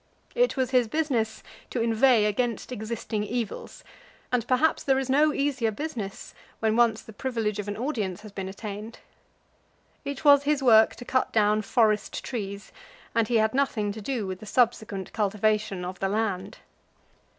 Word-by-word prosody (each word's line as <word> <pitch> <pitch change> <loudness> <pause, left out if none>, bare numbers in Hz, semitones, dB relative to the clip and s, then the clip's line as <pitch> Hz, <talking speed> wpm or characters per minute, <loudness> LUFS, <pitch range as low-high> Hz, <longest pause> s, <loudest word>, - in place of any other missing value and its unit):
It - - +2
was 260 -1 0
his 250 -3 +3
business 240 -5 -1 0.3
to 250 - -3
inveigh 230 0 +4
against 230 +3 -1
existing 220 -2 -3
evils, 230 0 -5 0.5
and 245 -3 0
perhaps 260 +5 +2
there 270 -1 +2
is 265 -1 -1
no 300 +3 +4
easier 275 -5 0
business 220 -5 -6 0.3
when 220 -1 +1
once 230 -2 +3
the 220 - -12
privilege 220 -4 -2
of 205 - -4
an 205 - -4
audience 215 -7 -3
has 215 -1 -11
been 195 -1 -5
attained. 210 +2 -7 1.1
It 280 +1 -6
was 285 -1 +8
his 290 -1 0
work 220 -3 +6
to 245 - -10
cut 260 +1 0
down 215 -1 +3
forest 215 -1 +1
trees, 200 -4 -5 0.4
and 230 -2 +2
he 240 - 0
had 220 0 +2
nothing 245 -6 0
to 215 +1 -7
do 230 -1 -2
with 185 -1 -5
the 215 - -11
subsequent 220 -5 0
cultivation 210 -2 0
of 180 0 -6
the 195 - 0
land. 200 -2 -2
225 Hz, 165 wpm, -26 LUFS, 210-255 Hz, 1.1 s, was